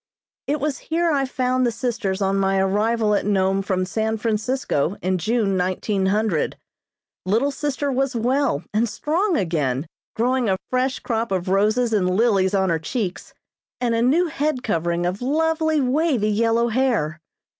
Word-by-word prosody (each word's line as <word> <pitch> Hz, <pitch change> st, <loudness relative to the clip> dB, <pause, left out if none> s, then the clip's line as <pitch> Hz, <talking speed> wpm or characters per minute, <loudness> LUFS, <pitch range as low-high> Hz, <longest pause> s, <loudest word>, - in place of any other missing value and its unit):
It 295 Hz, +2 st, 0 dB
was 285 Hz, 0 st, -2 dB
here 335 Hz, +1 st, +2 dB
I 275 Hz, -2 st, +1 dB
found 255 Hz, -1 st, 0 dB
the 240 Hz, -, +2 dB
sisters 215 Hz, -5 st, -2 dB
on 195 Hz, 0 st, +1 dB
my 195 Hz, 0 st, +1 dB
arrival 210 Hz, +3 st, +1 dB
at 205 Hz, -, +1 dB
Nome 195 Hz, -1 st, +1 dB
from 185 Hz, -1 st, -1 dB
San 220 Hz, +3 st, -1 dB
Francisco 215 Hz, -, -1 dB
in 185 Hz, 0 st, 0 dB
June, 215 Hz, +1 st, 0 dB
1900. 190 Hz, 0 st, 0 dB, 0.7 s
Little 225 Hz, +10 st, +1 dB
sister 285 Hz, 0 st, -2 dB
was 270 Hz, 0 st, 0 dB
well 245 Hz, -, +1 dB
and 225 Hz, +2 st, +1 dB
strong 345 Hz, -, 0 dB
again, 150 Hz, -7 st, -1 dB, 0.3 s
growing 245 Hz, 0 st, +1 dB
a 190 Hz, -, +1 dB
fresh 255 Hz, +1 st, +1 dB
crop 230 Hz, -2 st, -2 dB
of 185 Hz, -1 st, -1 dB
roses 215 Hz, +5 st, +2 dB
and 185 Hz, -4 st, +2 dB
lilies 200 Hz, -4 st, +2 dB
on 190 Hz, -2 st, +2 dB
her 165 Hz, -, +1 dB
cheeks, 185 Hz, +2 st, -4 dB, 0.4 s
and 240 Hz, -2 st, 0 dB
a 230 Hz, -, +1 dB
new 295 Hz, +9 st, +3 dB
head 305 Hz, -5 st, -2 dB
covering 170 Hz, -3 st, -1 dB
of 185 Hz, +4 st, -2 dB
lovely, 315 Hz, +3 st, +1 dB
wavy 260 Hz, -5 st, +1 dB
yellow 230 Hz, +2 st, +2 dB
hair. 225 Hz, -, 0 dB
225 Hz, 155 wpm, -22 LUFS, 190-260 Hz, 0.7 s, new